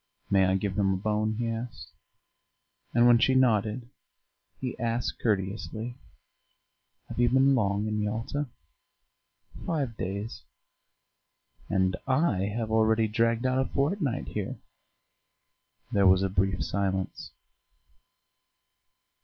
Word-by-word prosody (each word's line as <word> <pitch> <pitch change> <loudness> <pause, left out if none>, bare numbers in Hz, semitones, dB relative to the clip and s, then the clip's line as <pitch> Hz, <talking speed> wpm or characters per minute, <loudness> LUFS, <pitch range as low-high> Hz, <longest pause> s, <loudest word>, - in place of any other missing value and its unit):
"May 95 -1 +5
I 95 - +2
give 95 +1 -1
him 95 -1 +3
a - - -1
bone?" 110 +2 0
he 120 0 -1
asked; 115 +1 -5 1.0
and 120 0 +4
when 120 -1 +7
she 130 +2 +3
nodded 115 -2 +2 0.7
he 125 -2 -3
asked 115 +1 -2
courteously, 110 +3 -2 1.1
"Have - - -7
you 120 0 +4
been 135 +2 +4
long 100 -4 +1
in 105 0 -1
Yalta?" 115 +7 -2 1.2
"Five 140 -8 -1
days." 100 +4 -4 1.3
"And 95 -2 +2
I 130 - +2
have 110 +2 -3
already 110 0 +3
dragged 115 +3 +1
out 130 0 +2
a - - -5
fortnight 145 - -1
here." - - -4 1.3
There 100 -1 +4
was 95 +1 +5
a 95 - +1
brief 95 -1 0
silence. 95 -1 -2
110 Hz, 115 wpm, -28 LUFS, 100-120 Hz, 1.3 s, when